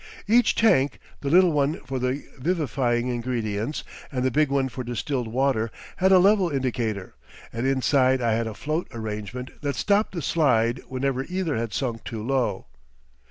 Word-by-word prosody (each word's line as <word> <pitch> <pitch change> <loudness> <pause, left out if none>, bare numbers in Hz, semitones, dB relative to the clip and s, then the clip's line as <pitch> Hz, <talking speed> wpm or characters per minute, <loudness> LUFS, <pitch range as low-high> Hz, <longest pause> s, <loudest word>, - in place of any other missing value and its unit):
Each 235 +3 +4
tank, 145 -12 +3 0.2
the 140 - -3
little 180 +2 +6
one 150 +3 +1
for 135 -1 -4
the 130 +3 -1 0.2
vivifying 130 -6 0
ingredients 120 0 -2 0.3
and 130 -2 -1
the 130 - +2
big 150 +2 +2
one 140 -1 +1
for 125 0 -6
distilled 120 +1 -2
water, 120 -1 +1 0.3
had 190 +1 +3
a 190 - +8
level 195 0 +4
indicator, 120 - -2 0.4
and 115 +3 -1
inside 130 -1 +3
I 120 -2 +1
had 115 +1 0
a 110 - -6
float 155 - -2
arrangement 110 +2 -5
that 145 -2 -2
stopped 205 +5 +1
the 170 -4 -4
slide 120 -8 +2
whenever 130 0 -1
either 180 -4 -2
had 115 -1 -2
sunk 115 -3 -3
too 110 -4 -5
low. 120 -6 0
130 Hz, 165 wpm, -25 LUFS, 115-150 Hz, 0.4 s, a